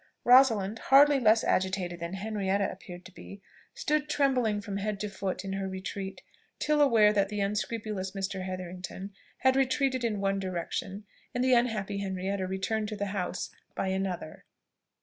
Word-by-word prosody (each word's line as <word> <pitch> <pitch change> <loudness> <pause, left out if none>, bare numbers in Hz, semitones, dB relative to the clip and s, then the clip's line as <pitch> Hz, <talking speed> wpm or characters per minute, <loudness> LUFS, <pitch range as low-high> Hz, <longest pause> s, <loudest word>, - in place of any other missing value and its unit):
Rosalind, 225 -5 +5
hardly 280 +1 +6
less 220 -2 +4
agitated 185 -2 0
than 170 +2 -5
Henrietta 200 -1 -1
appeared 175 -1 -11
to 185 - -11
be, 195 +2 -11 0.4
stood 300 0 0
trembling 255 -8 +2
from 200 -1 -5
head 205 0 -2
to 210 - -2
foot 195 -1 -4
in 195 - -3
her 195 0 -2
retreat, 190 +1 -6 0.3
till 300 0 +2
aware 220 -7 +5
that 200 -1 +2
the 210 0 -3
unscrupulous 205 -1 -2
Mr. 195 -1 -3
Hetherington 185 +1 -6 0.3
had 260 0 +4
retreated 265 -1 +1
in 215 -3 0
one 195 0 0
direction, 190 +2 -4 0.3
and 245 - +1
the 255 0 +4
unhappy 215 -5 +1
Henrietta 190 0 -2
returned 190 +3 -1
to 215 - -4
the 205 0 -2
house 180 -2 -3 0.2
by 190 - -1
another. 190 -4 -3
200 Hz, 160 wpm, -29 LUFS, 190-225 Hz, 0.4 s, hardly